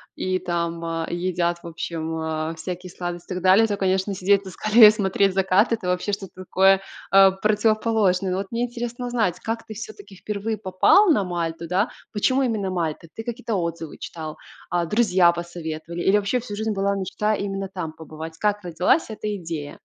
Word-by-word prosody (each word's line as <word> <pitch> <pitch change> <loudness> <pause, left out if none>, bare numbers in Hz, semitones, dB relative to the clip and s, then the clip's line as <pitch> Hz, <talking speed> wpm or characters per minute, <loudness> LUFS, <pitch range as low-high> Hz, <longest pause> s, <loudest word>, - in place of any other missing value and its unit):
и 185 0 -1
там, 170 -1 -2
а, 165 0 -2
едят, 175 -1 -1
в - - -7
общем, 160 -1 -4
а, 160 0 -2
всякие 180 +2 -6
сладости 175 -1 -6
и - - -5
так 180 - -5
далее, 195 +5 +6
то, 205 - -1
конечно, 190 0 0
сидеть 200 +1 +2
на 190 - -7
скале 215 +4 +7
и - - +8
смотреть 195 -2 +1
закат- 195 +4 +3
это 210 -5 -3
вообще 180 +3 -1
что-то 195 -3 -5
такое, 190 +1 +4 0.3
э, 195 0 +7
противоположное. 215 -3 +2
Но 185 - 0
вот 195 - -3
мне 235 +1 -1
интересно 240 0 -4
узнать, 220 -8 0
как 225 0 -3
ты, 220 - -8
всё-таки, 405 - -9
впервые 210 +3 -3
попал 210 - +4
на 205 -9 +2
Мальту, 170 -2 -3
да, 190 +6 +1 0.2
почему 255 +6 +2
именно 215 -6 -1
Мальта? 165 -3 -3
Ты 225 - -7
какие-то 235 -2 -3
отзывы 170 -3 -3
читал? 155 -2 -7 0.3
А, 175 0 0
друзья 185 -4 +4
посоветовали? 170 -1 -6
Или 195 - +3
вообще 205 +5 0
всю 215 -4 -7
жизнь 220 +1 -2
была 200 0 0
мечта 195 +3 -1
именно 195 -1 -3
там 180 -4 -5
побывать? 160 +1 -9
Как 205 +1 0
родилась 180 - +1
эта 210 -1 -4
идея? 160 -4 -6
190 Hz, 185 wpm, -23 LUFS, 170-210 Hz, 0.3 s, и